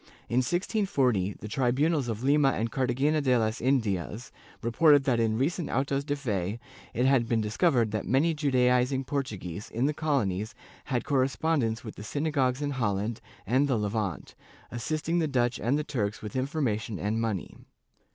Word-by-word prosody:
In 120 - -1
1640, 130 - +1
the - - -6
tribunals 135 +5 +1
of 115 0 -4
Lima 140 0 +4
and 115 +1 -2
Cartagena 135 +4 +1
de 130 -3 +3
las 110 0 -1
Indias 110 - -1 0.3
reported 145 +5 +5
that 130 -4 +1
in 110 -1 +1
recent 155 +6 -1
autos 135 +1 0
de 145 0 -1
fe 105 -6 -2 0.3
it 125 - 0
had 130 -4 +3
been 115 - +2
discovered 115 - +2
that 110 - -3
many 150 +6 +3
Judaizing 130 -2 +2
Portuguese 110 - -4
in 120 +4 -1
the 150 - +1
colonies 115 -8 -1 0.3
had 125 -4 -1
correspondence 135 -3 0
with 110 - -8
the 105 - -7
synagogues 140 +1 0
in 145 - -1
Holland 110 -3 -1 0.2
and 130 +7 +2
the 130 -4 +1
Levant, 105 -4 -3 0.4
assisting 155 +8 -1
the 160 - +1
Dutch 125 -3 0
and 125 +6 +1
the 150 - -1
Turks 105 -9 -3
with 105 - -7
information 130 -6 -1
and 105 +4 -1
money. 110 -5 -3
125 Hz, 160 wpm, -28 LUFS, 110-140 Hz, 0.4 s, reported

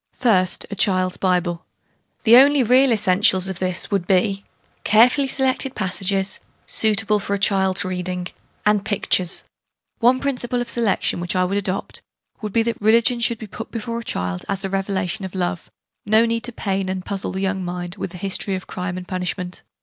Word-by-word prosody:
First, 190 -8 +2
a - - -4
Child's 185 -2 +1
Bible. 180 -2 0 0.6
The 230 +1 +7
only 275 +1 +6
real 255 +3 +4
essentials 190 -3 +3
of 190 -2 -5
this 185 +2 -2
would 195 -3 -1
be, 195 +1 +1 0.4
carefully 245 +6 +4
selected 265 0 0
passages, 195 0 0 0.3
suitable 210 -1 +4
for 200 0 -2
a - - -2
child's 190 -1 +2
reading 180 -1 -3 0.4
and 210 -1 +2
pictures. 195 -4 +1 0.6
One 245 +2 +4
principle 250 -3 -2
of 245 -1 -3
selection, 225 -6 0
which 175 +1 -3
I 185 0 +2
would 190 +2 -2
adopt, 195 -1 -4 0.4
would 210 -1 -4
be 225 +3 +2
that 230 -1 -3
Religion 230 +3 +3
should 235 0 +1
be 220 - -8
put 220 +2 -8
before 230 0 -5
a - - -8
child 90 - -3
as 195 -1 -2
a 190 - -4
revelation 195 0 -2
of 190 0 -7
love 180 0 -3 0.3
no 220 +2 +4
need 230 0 -2
to 245 - -4
pain 195 -4 -2
and 185 -1 -4
puzzle 200 -1 -4
the 190 - -3
young 190 -1 -1
mind 175 +1 -5
with 190 - -4
the 180 - -10
history 195 +1 -2
of 185 - -6
crime 180 0 -5
and 180 0 -8
punishment. 180 -1 -4
195 Hz, 185 wpm, -21 LUFS, 185-225 Hz, 0.6 s, The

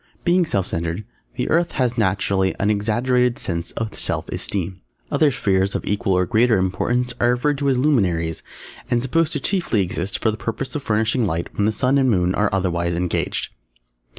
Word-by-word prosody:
Being 175 -1 +3
self 100 - 0
centred, 85 +5 -3 0.3
the - - -2
Earth 170 +1 +2
has 125 -3 0
naturally 95 -3 +1
an 100 +2 +2
exaggerated 120 +4 +1
sense 85 -1 -3
of 110 -2 -4
self - - -2
esteem. 95 -1 -3 0.3
Other 155 - +4
Spheres 100 -6 +1
of - - -2
equal 100 -1 0
or 90 0 +2
greater 115 +1 +3
importance 120 +7 0
are 120 - +3
referred 135 +4 +1
to 140 -1 +1
as 130 - +2
"Luminaries" 90 - +1 0.5
and 120 0 +1
supposed 160 +4 +1
to - - 0
exist - - -1
chiefly 120 - +1
for 95 +5 -1
the 110 - -6
purpose 125 +4 -3
of 150 - -3
furnishing 110 0 +1
light 85 0 -3
when 100 - +1
the - - +2
Sun 125 +6 +2
and 130 -1 +3
Moon 90 -4 +2
are 105 +1 +1
otherwise 85 -3 0
engaged. 90 0 -2
105 Hz, 185 wpm, -21 LUFS, 95-125 Hz, 0.5 s, Other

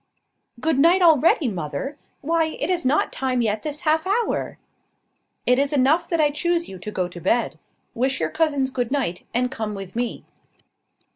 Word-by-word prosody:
"Good 310 +1 +1
night 345 +5 +5
already, 320 -2 +5
mother! 175 - -4 0.3
Why, 325 +2 +1
it 300 +6 -1
is 350 -2 0
not 270 +4 +1
time 255 -2 0
yet 215 -1 0
this 300 -1 -4
half 315 +1 +1
hour." 445 +4 -1 0.9
"It 250 +1 +4
is 280 0 +1
enough 290 +5 +3
that 335 - 0
I 295 -1 +4
choose 340 +3 0
you 190 - -9
to 195 - -6
go 185 -4 -2
to 175 -1 -10
bed. 235 +8 0 0.3
Wish 260 +2 0
your - - -1
cousins 285 -5 +1
good 245 -3 -2
night, 260 -11 -2
and 250 +2 0
come 215 -3 -4
with 195 0 -8
me." 240 0 -3
270 Hz, 175 wpm, -23 LUFS, 235-320 Hz, 0.9 s, night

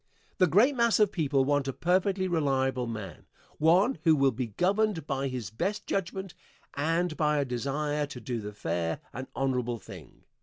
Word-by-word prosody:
The 185 - +5
great 230 - +4
mass 235 -2 +3
of 210 -2 +4
people 140 -7 +1
want 145 -1 +1
a 135 - -2
perfectly 185 +3 +1
reliable 135 -6 0
man 110 -4 -7 0.3
one 180 - +4
who 160 -2 +5
will 135 -2 +3
be 125 +1 -3
governed 190 - 0
by 135 -2 -1
his 125 -8 -5
best 195 - -2
judgment 190 0 -3 0.4
and 165 +3 0
by 150 -1 +1
a 140 - +1
desire 145 +4 -2
to 130 - -8
do 120 -2 -4
the 105 0 -6
fair 85 -4 -2
and 130 +2 -6
honorable 125 -3 -1
thing. 90 - -13
145 Hz, 175 wpm, -29 LUFS, 125-180 Hz, 0.4 s, The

